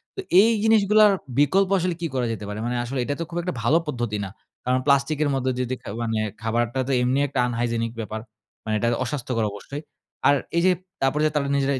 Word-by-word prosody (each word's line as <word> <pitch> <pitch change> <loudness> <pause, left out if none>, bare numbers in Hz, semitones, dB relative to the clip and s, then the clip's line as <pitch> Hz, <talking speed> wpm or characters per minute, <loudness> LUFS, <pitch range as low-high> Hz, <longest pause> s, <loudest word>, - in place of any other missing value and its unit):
তো - - -7 0.2
এই 220 - +5
জিনিসগুলার 215 -1 +5 0.3
বিকল্প 190 +6 +3
আসলে 180 0 -1
কি 170 - 0
করা 130 -2 0
যেতে 105 -2 -5
পারে? 105 +1 -5
মানে 120 - -1
আসলে 130 +2 -3
এটা 145 - -2
তো - - -1
খুব 175 - -5
একটা 180 -1 -3
ভালো 140 +8 +4
পদ্ধতি 120 -6 -2
না। - - -6 0.4
কারণ 125 +1 +2
প্লাস্টিকের 145 +2 +2
মধ্য 130 -1 -1
দিয়ে 125 0 -1
দে - - 0
খা - - -7
মানে 115 -1 -1 0.2
খাবারটা 120 +3 0
তো - - -1
এমনি 125 +2 +2
একটা 135 -1 -3
unhygienic 115 -1 -1
ব্যাপার। 110 0 -4 0.4
মানে 110 - -2
এটা 115 - +1 0.2
অস্বাস্থ্যকর 125 -4 -2
অবশ্যই। 140 +9 -7 0.5
আর 145 - +6 0.2
এই - - +4
যে 185 - +6 0.3
তারপরে 135 +3 +1
যে 155 - +2
তারা 140 -2 +1
নিজেরাই 140 -1 +1
135 Hz, 215 wpm, -24 LUFS, 120-150 Hz, 0.5 s, আর